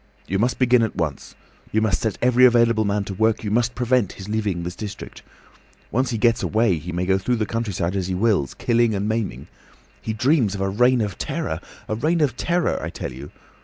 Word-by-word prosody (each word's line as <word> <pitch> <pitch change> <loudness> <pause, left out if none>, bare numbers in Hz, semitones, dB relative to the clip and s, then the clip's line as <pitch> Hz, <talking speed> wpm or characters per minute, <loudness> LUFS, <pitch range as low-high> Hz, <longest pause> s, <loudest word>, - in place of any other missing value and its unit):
"You 95 +2 -1
must 120 +3 +1
begin 125 -1 +4
at 110 - -1
once. 75 -6 -4 0.4
You 110 - +2
must 110 -3 +1
set 110 -4 -1
every 125 0 +4
available 115 -3 +5
man 100 0 0
to 100 - -6
work; 110 +3 +1
you 105 - -3
must 120 +2 +1
prevent 125 -4 +1
his 95 - -10
leaving 105 -5 -1
this 90 +1 -5
district. 105 0 -8 0.7
Once 130 +3 +1
he 115 - -2
gets 115 +1 +2
away, 110 -6 +1
he 90 +4 -7
may 90 +1 -2
go 95 +1 +2
through 125 +6 0
the 110 -2 -1
countryside 100 -5 -2
as 95 -2 -1
he 95 - -2
wills, 95 -9 +1
killing 120 -2 +2
and 100 +1 -1
maiming. 110 -1 -2 0.6
He 110 - -3
dreams 120 -2 +2
of 95 - -4
a 95 - 0
reign 125 +4 +3
of 105 -3 -3
terror! 80 +1 -3 0.3
A - - -2
reign 155 +10 +1
of 140 -6 +1
terror, 175 +5 0
I - - -4
tell - - -6
you. 70 +3 -9
110 Hz, 220 wpm, -22 LUFS, 95-120 Hz, 0.7 s, available